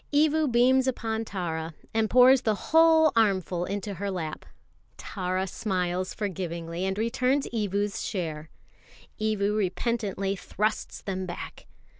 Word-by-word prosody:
Evu 305 -1 +3
beams 255 +2 +4
upon 225 -3 -1
Tara, 165 -5 -4 0.2
and 220 -1 +1
pours 255 +1 +7
the 220 -4 +1
whole 320 +4 +5
armful 190 -5 +1
into 200 +1 -4
her 200 +2 -4
lap. 165 -5 -4 0.5
Tara 185 -1 -2
smiles 185 -2 -2
forgivingly, 170 -3 -4
and 190 +1 -1
returns 250 +5 +1
Evu's 205 -2 -1
share. 160 -6 -4 0.7
Evu 210 -1 0
repentantly 200 -1 -1
thrusts 215 +3 -3
them 190 -1 -3
back. 175 - -8
205 Hz, 120 wpm, -27 LUFS, 185-235 Hz, 0.7 s, pours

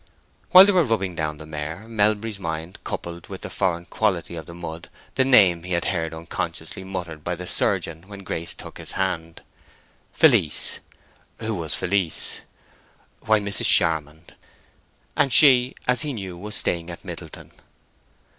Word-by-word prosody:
While 185 +1 +10
they 205 - +3
were 180 -3 +3
rubbing 110 - -1
down 80 -2 -3
the 80 - -11
mare, 80 +6 -7
Melbury's 105 -1 0
mind 85 0 -6
coupled 85 0 -6
with - - -9
the - - -7
foreign 85 -3 -1
quality 95 -6 -2
of 80 - -8
the 85 - -10
mud 85 -1 -8 0.2
the 130 - +2
name 100 -10 +5
he 90 +1 -5
had 85 - -1
heard 80 -4 -2
unconsciously 80 +3 -6
muttered 90 -5 -7
by 90 - -3
the 90 +1 -8
surgeon 85 0 +3
when 100 -1 -11
Grace 85 -2 -4
took - - -11
his - - -2
hand—"Felice." 85 -3 -1 0.6
Who 110 0 -2
was 80 -6 -4
Felice? 95 -3 0 0.9
Why, 110 -1 +4
Mrs. 100 0 0
Charmond; 80 0 +2 0.8
and 140 -2 +1
she, 130 -1 +6
as 125 0 +3
he 150 -2 -2
knew, 95 -6 -7
was 105 +4 -5
staying 85 -2 -1
at 85 - -10
Middleton. - - -10
90 Hz, 155 wpm, -23 LUFS, 85-105 Hz, 0.9 s, While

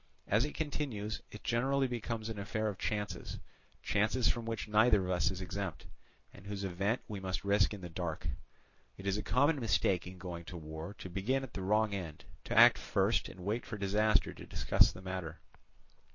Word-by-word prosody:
As 110 +6 +3
it 150 - -5
continues, 130 -9 -3
it 105 - -11
generally 135 +3 +2
becomes 115 -2 -3
an 110 -2 -4
affair 110 +2 -1
of 100 - -6
chances, 105 -3 -3 0.5
chances 110 +4 +2
from 120 -1 0
which 115 -4 -3
neither 105 -1 +5
of 90 - -2
us 90 +5 +3
is 95 -1 -5
exempt, 95 -2 -4 0.5
and 100 0 -13
whose 100 -1 -4
event 100 +5 0
we 105 -3 -5
must 95 -2 -3
risk 100 0 +4
in 105 -2 -6
the 90 - -5
dark. 85 -2 -4 0.7
It 95 - -10
is 100 -1 +1
a - - -1
common 145 +9 +3
mistake 90 -5 +2
in 90 +1 -9
going 90 -2 -6
to 90 - -7
war 80 +4 -7
to 95 - -8
begin 105 +9 0
at 130 - -8
the 95 - -4
wrong 105 +2 +2
end, 85 -6 -5 0.2
to - - -2
act - - +9
first, - - +1
and 95 - -11
wait 110 +4 0
for 105 - -6
disaster 105 +2 +2
to - - -10
discuss - - +4
the 90 - -11
matter. 95 -3 -4
100 Hz, 195 wpm, -33 LUFS, 95-110 Hz, 0.7 s, act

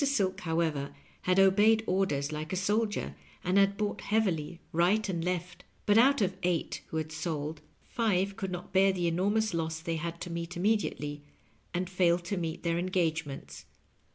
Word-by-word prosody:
Silk, 200 -9 +1
however, 160 -5 -1 0.3
had 185 +1 +2
obeyed 210 +3 +5
orders 155 -8 0
like 155 0 -4
a - - 0
sol 210 +4 +2
dier, 70 - -4 0.3
and 185 +2 +3
had 200 0 +3
bought 210 -1 -2
heavily 175 -7 0
right 185 +6 +2
and 170 -4 -2
left; 180 0 -3 0.2
but 205 - +4
out 265 +3 +5
of 190 -1 0
eight 175 -2 -1
who 160 - -4
had 155 0 -3
sold, 155 -1 -3 0.2
five 200 -5 0
could 195 - -4
not 180 0 -6
bear 195 +1 +5
the 180 -2 -2
enormous 200 +5 +1
loss 160 -1 -2
they 165 0 -2
had 170 +1 -4
to 175 - -5
meet 170 +1 -4
immediately, 175 -7 0 0.5
and 180 +1 -2
failed 175 -1 +2
to 200 - -2
meet 165 -2 -3
their 170 0 +1
engagements. 160 -5 -2
180 Hz, 175 wpm, -30 LUFS, 165-195 Hz, 0.5 s, obeyed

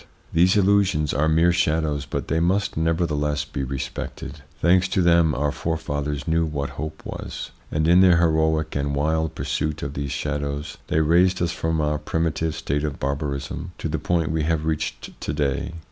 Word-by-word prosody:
These 90 +5 +4
illusions 95 -6 +3
are 80 +2 +2
mere 80 +2 +4
shadows, 80 -3 0
but - - -3
they 80 - +1
must 95 +4 +1
nevertheless 75 -3 0
be 75 -2 -4
respected. 65 +1 -5 0.2
Thanks 90 +2 +4
to 95 0 +1
them 85 -2 +4
our 75 +1 0
forefathers 75 -4 -3
knew 80 0 +2
what 75 -3 -3
hope 80 +2 -6
was, - - -6 0.2
and 80 +1 +1
in 90 +2 +6
their 90 -3 +6
heroic 80 -1 +2
and 70 0 -1
wild 80 +2 0
pursuit 75 +1 -2
of 70 - -4
these 70 -1 -3
shadows 75 0 -3
they 80 - +2
raised 90 +4 +3
us 85 -1 0
from 80 -1 -1
our 75 -1 0
primitive 80 -1 -1
state 70 +1 -2
of 75 -2 -3
barbarism 70 +5 -3
to - - -3
the 80 0 -2
point 80 +1 0
we 80 -1 0
have 80 0 0
reached 80 -1 -3
to 70 - -2
day. 70 -1 -1
80 Hz, 175 wpm, -23 LUFS, 75-85 Hz, 0.2 s, in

